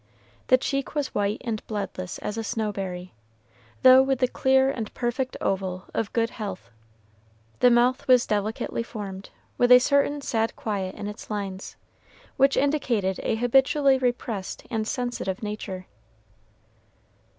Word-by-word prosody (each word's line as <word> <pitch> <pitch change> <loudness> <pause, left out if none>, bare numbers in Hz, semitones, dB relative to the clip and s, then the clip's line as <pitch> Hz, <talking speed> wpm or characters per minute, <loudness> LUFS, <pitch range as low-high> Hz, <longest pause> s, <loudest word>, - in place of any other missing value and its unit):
The 255 - +6
cheek 275 +2 -3
was 290 -2 -2
white 205 +1 0
and 225 -3 -3
bloodless 195 -4 -4
as 210 - -5
a 225 - -3
snowberry, 195 -6 -3 0.7
though 260 0 +9
with 270 0 +1
the 255 0 +2
clear 265 +1 +3
and 225 -5 -5
perfect 250 +2 -2
oval 190 -1 -2
of 225 -2 -2
good 230 0 0
health; 200 -5 -7 0.9
the 250 - +6
mouth 245 +2 +2
was 250 -2 +5
delicately 215 +2 -2
formed, 200 -4 -7 0.3
with 245 0 +4
a 250 - +11
certain 280 +3 +2
sad 225 -4 -1
quiet 195 -4 -3
in 205 - -6
its 210 - -8
lines, 195 -2 -5 0.6
which 275 +1 +3
indicated 240 -10 +1
a - - 0
habitually 265 +3 +3
repressed 240 -6 -3
and 220 -2 -1
sensitive 245 -6 -3
nature. 200 -3 -5
225 Hz, 140 wpm, -25 LUFS, 200-255 Hz, 0.9 s, a